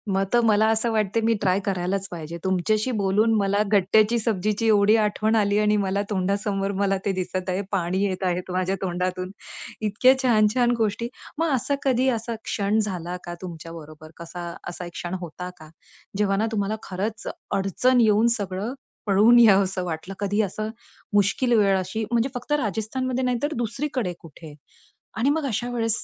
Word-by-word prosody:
मग 195 - +2
तर 240 - +6
मला 215 0 +4
असं 225 +1 +1
वाटतंय 215 0 +1
मी 230 - +4
ट्राय 185 +1 +2
करायलाच 190 0 -1
पाहिजे. 170 0 -6
तुमच्याशी 210 +6 +1
बोलून 210 +4 +2
मला 200 +1 +2
गट्ट्याची 210 +3 +4
सब्जीची 215 0 0
एवढी 210 0 +5
आठवण 215 +1 +1
आली 205 -1 +2
आणि 210 0 +3
मला 200 0 0
तोंडासमोर 200 0 -1
मला 195 -1 +2
ते 200 - +2
दिसत 185 0 -3
आहे. 185 +2 0
पाणी 185 +1 0
येत 190 -1 -3
आहे 180 0 0
माझ्या 185 +1 0
तोंडातून. 185 0 -2 0.5
इतक्या 220 +5 +4
छान-छान 240 +1 +3
गोष्टी 225 +1 -1 0.3
मग 330 0 +1
असा 280 +4 0
कधी 260 -1 +2
असा 230 -1 -2
क्षण 205 +1 0
झाला 180 -4 -3
का, 175 - -6
तुमच्या 165 -2 -8
बरोबर 155 -1 -11
कसा 170 +1 -7 0.2
असा 175 0 -7
एक 175 - -8
क्षण 175 +1 -5
होता 180 +2 -6
का? 155 -1 -13 0.5
जेव्हा 200 -1 +2
ना 220 - +1
तुम्हाला 205 0 -1
खरंच 210 +4 -4 0.3
अडचण 240 +6 +2
येऊन 220 +1 +4
सगळं 200 +4 -4 0.3
पळून 215 +4 +6
यावसं 195 -4 +4
वाटलं. 170 +3 -5
कधी 205 +1 +1
असं 215 +2 -3 0.4
मुश्कील 205 +5 +2
वेळ 195 -2 +4
अशी 220 +4 -3
म्हणजे 235 +3 +2
फक्त 250 +4 -6
राजस्थानमध्ये 255 +1 -1
नाही 250 -1 +1
तर 295 - 0
दुसरीकडे 240 -4 -2
कुठे? 160 -1 -12 0.6
आणि 255 +5 +2
मग 305 0 0
अशा 240 +1 -2
वेळेस 225 -2 0
205 Hz, 170 wpm, -24 LUFS, 185-225 Hz, 0.6 s, तर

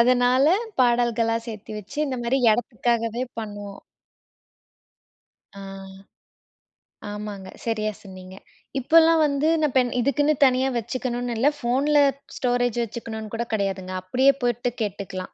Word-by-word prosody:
அதனால 250 +3 +4 0.4
பாடல்களா 235 -1 +2
சேர்த்தி 215 -1 -8
வச்சு 210 +8 -10
இந்த 260 -3 -3
மாரி 260 +3 +1
இடத்துக்காவே 235 +1 -1 0.2
பண்ணோம். 205 -2 -7 1.8
ஆ. - - -8 1.5
ஆமாங்க. 205 -2 -7
சரியா 215 -2 -1
சொன்னீங்க. 185 -1 -11 0.4
இப்பெல்லாம் 325 +4 +5
வந்து 285 +1 0
நான் 300 -4 +1
பென் 250 -2 +3
இதுக்குன்னு 290 +4 +2
தனியா 260 0 +3
வச்சுக்கணும்னு 245 +1 -3
இல்ல. 250 +5 +3
ஃபோன்ல 280 +4 +2 0.4
ஸ்டோரேஜ் 245 -2 0
வச்சுக்கணும்னு 220 -1 -7
கூட 230 +1 -1
கிடையாதுங்க. 195 -3 -2
அப்டியே 255 +9 +3
போயிட்டு 245 0 0
கேட்டுக்கலாம். 195 -3 -5
235 Hz, 110 wpm, -24 LUFS, 215-255 Hz, 1.8 s, இப்பெல்லாம்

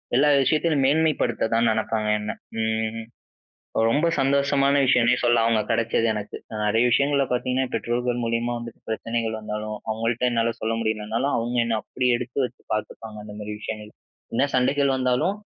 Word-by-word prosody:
எல்லா 140 +4 +4 0.2
விஷயத்துலயும் 150 0 +2
மேன்மைப்படுத்த 150 -7 +1
தான் 115 0 +3
நினைப்பாங்க 110 -1 -1
என்ன. 105 +1 -3 0.3
ம். 110 0 -2 0.8
ரொம்ப 150 +8 +2
சந்தோஷமான 140 0 +2
விஷயமுனே 125 -1 +4
சொல்லாம், 120 -1 +4
அவங்க 110 -2 +2
கிடைச்சது 115 0 +1
எனக்கு. 105 -1 -5 0.3
நிறைய 110 +3 +3
விஷயங்கள்ல 140 +1 +3
பாத்தீங்கன்னா, 130 +1 0
பெற்றோர்கள் 120 0 -1
மூலியமா 115 +1 -1
வந்துட்டு 115 -1 -10
பிரச்சனைகள் 115 0 -2
வந்தாலும், 105 0 -5
அவங்கள்ட்ட 115 +3 0
என்னால 115 0 +1
சொல்ல 115 +1 0
முடியலனாலும், 110 +5 -1
அவங்க 120 +1 -2
என்ன 115 -1 0
அப்படி 125 -1 -2
எடுத்து 125 - -7
வச்சு - - -11
பார்த்துப்பாங்க 110 0 -5
அந்த 105 -1 -9
மாதிரி 105 0 -5
விஷயங்கள்ல. 105 0 -7 0.4
என்ன 135 - +3
சண்டைகள் 135 +1 +2
வந்தாலும், 130 +10 +1
115 Hz, 145 wpm, -24 LUFS, 110-130 Hz, 0.8 s, எல்லா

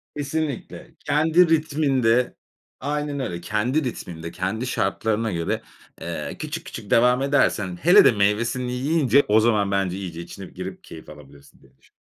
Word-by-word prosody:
Kesinlikle. 145 -1 -4
Kendi 160 +4 +3
ritminde, 140 -6 +2 0.4
aynen 145 +1 -3
öyle, 90 -10 -4
kendi 120 - 0
ritminde, 85 -9 -6
kendi 105 +7 -3
şartlarına 110 -2 -1
göre, 85 -1 -2 0.4
eee, - - -5
küçük - - -5
küçük - - -9
devam 125 +2 +4
edersen, 105 -10 +1
hele 180 +6 +7
de - - +7
meyvesini 115 +5 0
yiyince, 140 +1 +2
o 105 +1 +5
zaman 105 -3 +2
bence 95 -2 0
iyice 85 -4 -6
içine 95 +3 -9
girip 90 +1 -8
keyif 80 - -12
alabilirsin, 70 -2 -16
diye 65 0 -24
düşün. - - -28
115 Hz, 145 wpm, -23 LUFS, 95-140 Hz, 0.4 s, hele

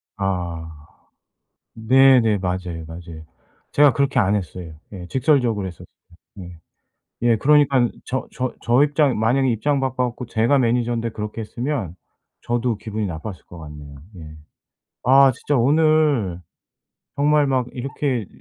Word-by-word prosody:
아. 85 -6 -4 0.9
네네 120 -2 +4
맞아요, 90 -3 -4
맞아요. 80 -1 -10 0.5
제가 145 -1 +5
그렇게 140 +1 0
안 100 -3 +2
했어요. 90 -4 -5 0.2
예. 90 -3 -8
직설적으로 125 - +1
했었어요. 90 -2 -10 0.5
네. 90 -3 -10 0.7
예 120 -1 +4
그러니까는 140 -2 +3
저 130 +1 -3
저 130 0 -3
저 120 +4 +3
입장 145 -4 +1
만약에 125 +5 +2
입장 140 +6 0
바꿔 130 -1 -1
갖고 125 +1 -7
제가 115 +4 +1
매니저인데 120 -2 0
그렇게 105 +1 -6
했으면 115 - -4 0.5
저도 120 -1 -1
기분이 110 0 -4
나빴을 90 +2 -7
것 85 - -12
같네요. 75 -2 -11 0.2
예. 80 -2 -11 0.7
아 135 +2 +6
진짜 135 +4 -2
오늘 145 - +2 0.8
정말 150 +1 +3
막 130 -3 0
이렇게 130 -1 -3
이 - - -11
115 Hz, 285 characters per minute, -21 LUFS, 95-135 Hz, 0.9 s, 아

